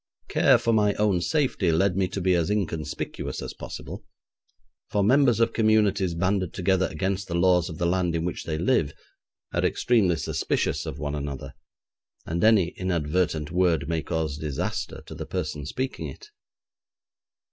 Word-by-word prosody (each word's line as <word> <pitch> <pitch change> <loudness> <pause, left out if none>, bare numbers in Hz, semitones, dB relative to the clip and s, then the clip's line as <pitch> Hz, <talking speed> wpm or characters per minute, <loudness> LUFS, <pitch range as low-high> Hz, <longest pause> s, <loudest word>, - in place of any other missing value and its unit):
Care - - +5
for 115 - 0
my 105 -2 +3
own 100 -4 +2
safety 125 - +1
led 90 +3 +2
me 95 -1 +1
to 95 - -4
be 95 0 +2
as 85 0 +1
inconspicuous 90 -7 -3
as - - -6
possible, - - -8 0.9
for 100 - +1
members 125 +1 +4
of 115 0 +2
communities 105 -5 +2
banded 95 0 0
together 95 0 +2
against 100 +1 -2
the 85 - -3
laws 90 0 +3
of 80 - -7
the 85 - -1
land 90 -1 +1
in 80 0 -1
which 90 - -4
they 80 -2 -2
live, 80 - +1 0.6
are - - 0
extremely 105 -8 +2
suspicious - - -1
of - - -5
one 75 -1 -3
another, 70 -2 -5 0.7
and 85 +1 -2
an 110 0 +7
inadvertent 85 -4 -1
word 85 -5 +2
may 80 -1 -1
cause 80 -4 -2
disaster 75 -3 -3
to - - -9
the - - -7
person 75 -6 -4
speaking 130 - -3
it. 425 0 -11
90 Hz, 160 wpm, -26 LUFS, 80-100 Hz, 0.9 s, an